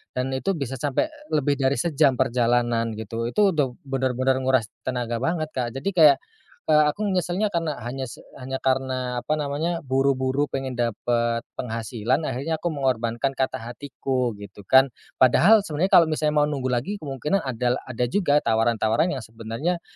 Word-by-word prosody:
dan 125 +1 -1
itu 160 +9 -1
bisa 135 -3 -4
sampe, 145 - 0 0.3
lebih 145 -1 +1
dari 135 +1 +2
sejam 150 -4 +2
perjalanan, 120 -2 +1
gitu. 115 +2 -4
Itu 200 +10 +3
udah 140 -6 0
bener-bener 130 -1 0
nguras 130 -4 +2 0.2
tenaga 120 -2 -2
banget, 155 +3 -1
Kak, 120 -3 -3
jadi 135 +9 -2
kayak, 155 -6 +6 0.5
eee, 150 0 +6
aku 200 - -5
nyeselnya 185 +3 0
karena 165 -5 -2
hanya 130 +3 -4
se 120 - -11 0.2
hanya 130 +1 -5
karena, 130 -2 0
apa 155 - 0
namanya, 155 +3 -2
buru-buru 135 0 +1
pengen 130 -2 -3
dapet 120 0 0 0.2
penghasilan, 115 +4 -2
akhirnya 155 +6 -3
aku 175 - 0
mengorbankan 130 -3 -1
kata 130 0 -1 0.2
hatiku, 130 -3 -2
gitu 100 0 -11
kan. 135 +1 +6 0.3
Padahal 195 - +5
sebenernya 165 +3 -1
kalau 170 - +7
misalnya 155 -1 0
mau 150 - +3
nunggu 135 -3 -2
lagi 130 +13 -1
kemungkinan 150 +7 -1
ada 125 -1 0
la - - -4
ada 125 0 -1
juga 145 0 +2
tawaran-tawaran 115 - +2
yang 120 - -7
sebenernya 115 +10 -3
130 Hz, 160 wpm, -24 LUFS, 120-150 Hz, 0.5 s, kalau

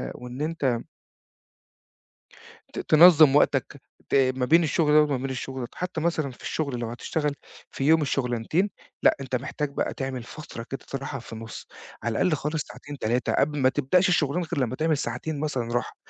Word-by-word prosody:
وإن 125 +2 -8
أنت 145 -7 0 2.0
ت - - -5
تنظم 155 -3 +7
وقتك 140 -1 +2 0.3
ت - - -2 0.2
ما 125 - 0
بين 165 +4 +5
الشغل 155 -1 +2
ده 150 - +7
وما 145 -2 0
بين 130 +1 -4
الشغل 130 0 -5
ده، 120 - -5
حتى 180 -2 -4
مثلًا 160 -4 0
في 125 - -15
الشغل 140 -6 -2
لو 120 -1 -3
هتشتغل 145 +4 -2 0.4
في 135 - -4
يوم 160 +1 +5
الشغلنتين 135 - 0 0.3
لأ، - - +5
أنت 130 -1 -2
محتاج 140 +3 -3
بقى - - -1
تعمل 130 -2 -4
فترة 120 -2 -9
كده 135 - -4
استراحة 135 0 -5
في 115 - -12
النُص، 115 0 -8 0.4
على 115 0 -1
الأقل 180 -4 +3
خالص 150 +2 -2
ساعتين 145 -1 -10
3، 120 +3 0
قبل 150 +1 +1
ما 130 -1 +4
تبدأش 150 +8 +2
الشغلانة 170 0 +1
غير 140 - -1
لمّا 125 +1 -4
تعمل 155 0 +1
ساعتين 140 +5 -3
مثلًا 130 -6 -2
راحة 120 - -2
140 Hz, 180 wpm, -26 LUFS, 125-155 Hz, 2.0 s, تنظم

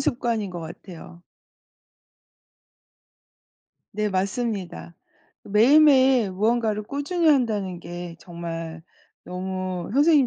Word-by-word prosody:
습관인 235 -6 -1
것 175 -1 -6
같아요. 170 +1 -11 2.7
네. 210 +1 -1
맞습니다. 190 - -3 0.5
매일매일 260 0 +5
무언가를 215 +2 0
꾸준히 285 - -2
한다는 210 - +1
게 175 0 -7
정말 165 -2 -7 0.4
너무 185 -1 -4
선생님 290 -1 +5
200 Hz, 200 characters per minute, -24 LUFS, 175-245 Hz, 2.7 s, 매일매일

